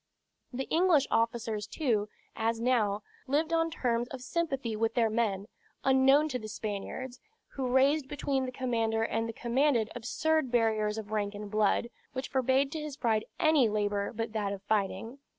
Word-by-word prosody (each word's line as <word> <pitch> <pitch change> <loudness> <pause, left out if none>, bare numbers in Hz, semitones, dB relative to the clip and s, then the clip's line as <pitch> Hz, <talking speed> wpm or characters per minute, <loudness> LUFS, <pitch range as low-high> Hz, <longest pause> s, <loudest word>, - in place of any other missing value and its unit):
The 260 +1 -3
English 330 -4 +4
officers, 225 -2 0
too, 215 -7 0 0.3
as 225 0 0
now, 220 -4 +1 0.2
lived 310 +5 +1
on 330 0 +2
terms 240 -6 -1
of 260 0 -8
sympathy 270 -7 -2
with 225 +1 0
their 230 -3 +3
men 210 -4 0 0.4
unknown 270 +3 +5
to 255 -3 -2
the 215 - -7
Spaniards, 220 +5 -5 0.3
who 265 -2 -3
raised 265 +3 +3
between 275 -2 -1
the - - -4
commander 230 -3 0
and 225 0 -1
the - - -4
commanded 240 -1 +1
absurd 310 +5 0
barriers 220 -3 +1
of 215 -1 -6
rank 205 -1 -1
and 205 0 -7
blood, 215 +2 +2 0.2
which 260 +1 -4
forbade 265 +1 +2
to 315 - -3
his 300 -2 -6
pride 220 -4 +1
any 310 -8 +4
labor 205 -1 -1
but 225 -1 -4
that 205 -2 -1
of 195 -1 -8
fighting. 215 +4 -1
235 Hz, 170 wpm, -30 LUFS, 215-270 Hz, 0.4 s, unknown